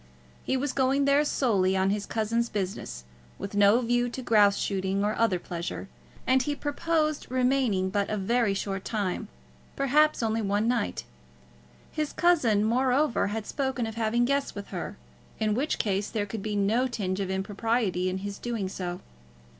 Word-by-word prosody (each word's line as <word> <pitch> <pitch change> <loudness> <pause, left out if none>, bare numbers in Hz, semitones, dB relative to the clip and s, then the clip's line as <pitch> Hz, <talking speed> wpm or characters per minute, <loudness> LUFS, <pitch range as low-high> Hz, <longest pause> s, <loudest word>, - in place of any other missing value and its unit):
He 265 - 0
was 270 +1 -2
going 275 +1 +2
there 280 +1 +4
solely 195 -10 +1
on 190 +1 +2
his 205 0 -2
cousin's 230 +1 0
business, 185 - -4 0.3
with 200 - -6
no 205 +4 +5
view 245 0 +1
to 255 +2 -6
grouse 205 -4 +4
shooting 195 0 -1
or 210 - +1
other 225 -5 +2
pleasure, 175 +2 -5 0.4
and 260 +1 +4
he 290 +3 -1
purposed 305 +1 -1
remaining 250 -7 +1
but 200 0 0
a 215 - -1
very 215 +1 +1
short 195 -1 -3
time, 210 -1 -2 0.5
perhaps 290 0 +3
only 225 0 0
one 205 +2 0
night. 235 - 0 0.9
His 305 -1 -2
cousin, 260 -13 +3
moreover, 255 +2 +2
had 215 +1 -3
spoken 265 -3 -2
of 225 - -5
having 230 +2 +1
guests 280 +2 0
with 200 -1 -7
her, - - -5 0.4
in 215 -1 +1
which 275 +8 0
case 200 -1 -1
there 210 -3 -1
could 205 +1 -6
be 210 +1 -3
no 215 +6 +2
tinge 200 -6 -3
of 195 -2 -2
impropriety 195 -1 0
in 185 - -2
his 200 +1 -6
doing 230 -6 -3
so. 180 -2 -5
220 Hz, 170 wpm, -27 LUFS, 195-255 Hz, 0.9 s, no